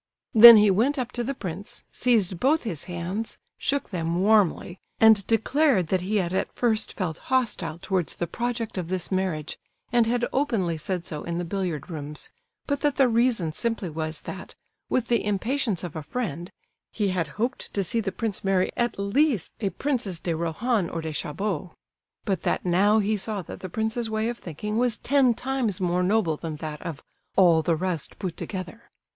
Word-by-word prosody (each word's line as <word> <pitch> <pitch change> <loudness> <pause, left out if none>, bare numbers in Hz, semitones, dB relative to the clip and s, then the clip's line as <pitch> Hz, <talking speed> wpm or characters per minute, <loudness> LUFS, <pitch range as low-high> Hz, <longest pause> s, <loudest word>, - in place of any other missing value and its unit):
Then 235 0 +12
he 210 -1 +5
went 245 +10 +2
up 245 -2 -2
to 240 - -3
the 275 +3 -3
prince, 190 -2 -6
seized 210 -8 +1
both 300 +5 +2
his 185 - -4
hands, 180 +5 -4 0.2
shook 280 -3 -1
them 170 -1 -1
warmly, 195 -3 +2 0.2
and 220 -2 +6
declared 225 - +2
that 185 -1 +1
he 195 +4 -2
had 185 -3 0
at 190 - -1
first 225 -3 0
felt 170 -6 -3
hostile 220 -11 0
towards 175 -3 -2
the 175 - -2
project 235 +1 -3
of 175 - -4
this 185 +1 -3
marriage, 185 -5 -2 0.3
and 240 -2 +3
had 240 +1 +1
openly 225 - 0
said 175 +2 -3
so 150 -1 -5
in 170 0 -3
the 175 - -2
billiard 175 -4 -3
rooms, 150 -1 -6 0.3
but 285 -1 -1
that 290 -2 +1
the 270 -2 +4
reason 230 -8 +2
simply 215 0 -2
was 155 0 -4
that, - - -8 0.3
with 245 -2 0
the 235 -1 +2
impatience 210 - 0
of 175 -3 -6
a 160 - -3
friend, 175 - -4 0.4
he 205 -3 0
had 180 -3 -1
hoped 240 +4 -2
to 200 - +1
see 230 +6 0
the 205 -3 -2
prince 220 -2 -3
marry 190 -1 +2
at 240 -1 -1
least 205 - +1
a 200 - 0
Princess 220 -3 -2
de 170 -1 -2
Rohan 170 +5 0
or 165 - -4
de 160 -1 -4
Chabot; 175 +2 -3 0.5
but 190 -4 0
that - - -1
now 195 +5 +4
he 215 0 +2
saw 205 -1 -3
that - - -9
the 185 - -6
prince's 220 +4 -2
way 220 +1 0
of 240 - -5
thinking 210 +7 -4
was 245 -3 +1
ten 260 -3 +3
times 250 -6 -1
more 180 -1 +1
noble 180 -4 +2
than 160 -1 -5
that 150 -1 -6
of 160 -5 -6 0.3
"all 170 -4 +5
the 165 +1 +1
rest 175 -2 -3
put 185 -4 -4
together." 190 +4 -7
200 Hz, 190 wpm, -25 LUFS, 170-235 Hz, 0.5 s, Then